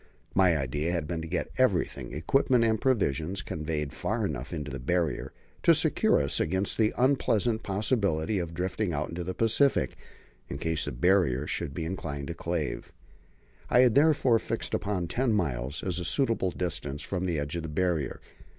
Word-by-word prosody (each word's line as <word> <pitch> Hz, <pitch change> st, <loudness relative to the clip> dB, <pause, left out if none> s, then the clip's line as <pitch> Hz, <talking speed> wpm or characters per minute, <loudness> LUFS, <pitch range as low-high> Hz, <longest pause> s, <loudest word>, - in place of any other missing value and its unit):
My 90 Hz, -4 st, +4 dB
idea 75 Hz, +4 st, -2 dB
had 85 Hz, -3 st, -1 dB
been 85 Hz, 0 st, -3 dB
to 80 Hz, -, -6 dB
get 90 Hz, +2 st, -2 dB
everything 105 Hz, -10 st, +1 dB
equipment 120 Hz, -, +2 dB
and 110 Hz, -1 st, +1 dB
provisions 95 Hz, -, 0 dB
conveyed 75 Hz, -2 st, -3 dB
far -, -, -1 dB
enough 65 Hz, +5 st, -4 dB
into 75 Hz, -4 st, -4 dB
the 65 Hz, -, -5 dB
Barrier 85 Hz, +4 st, -1 dB, 0.3 s
to -, -, +6 dB
secure -, -, +3 dB
us 70 Hz, -1 st, +1 dB
against 95 Hz, +7 st, -1 dB
the 110 Hz, -1 st, +4 dB
unpleasant 120 Hz, -4 st, +2 dB
possibility 100 Hz, -3 st, 0 dB
of 85 Hz, -1 st, -4 dB
drifting 90 Hz, +2 st, -1 dB
out 75 Hz, +1 st, -2 dB
into 85 Hz, +1 st, -4 dB
the 90 Hz, +2 st, -4 dB
Pacific 115 Hz, +5 st, +2 dB, 0.5 s
in 70 Hz, -, -4 dB
case 80 Hz, +1 st, 0 dB
the -, -, -3 dB
Barrier 75 Hz, -1 st, +2 dB
should 75 Hz, -2 st, -3 dB
be 80 Hz, -, -3 dB
inclined 75 Hz, -5 st, -4 dB
to -, -, -2 dB
calve. 85 Hz, -2 st, -3 dB, 0.8 s
I 125 Hz, -, +6 dB
had 125 Hz, -3 st, +5 dB
therefore 140 Hz, -5 st, +4 dB
fixed -, -, -3 dB
upon 95 Hz, -4 st, -1 dB
ten 120 Hz, +5 st, +1 dB
miles 70 Hz, -, -1 dB
as 90 Hz, -2 st, -1 dB
a -, -, -3 dB
suitable 115 Hz, -, +1 dB
distance 75 Hz, -6 st, -3 dB
from 95 Hz, -1 st, -2 dB
the 85 Hz, -3 st, -1 dB
edge 75 Hz, +2 st, -3 dB
of 85 Hz, -, -2 dB
the 80 Hz, -, -6 dB
Barrier. 85 Hz, -1 st, -1 dB
85 Hz, 180 wpm, -28 LUFS, 75-105 Hz, 0.8 s, to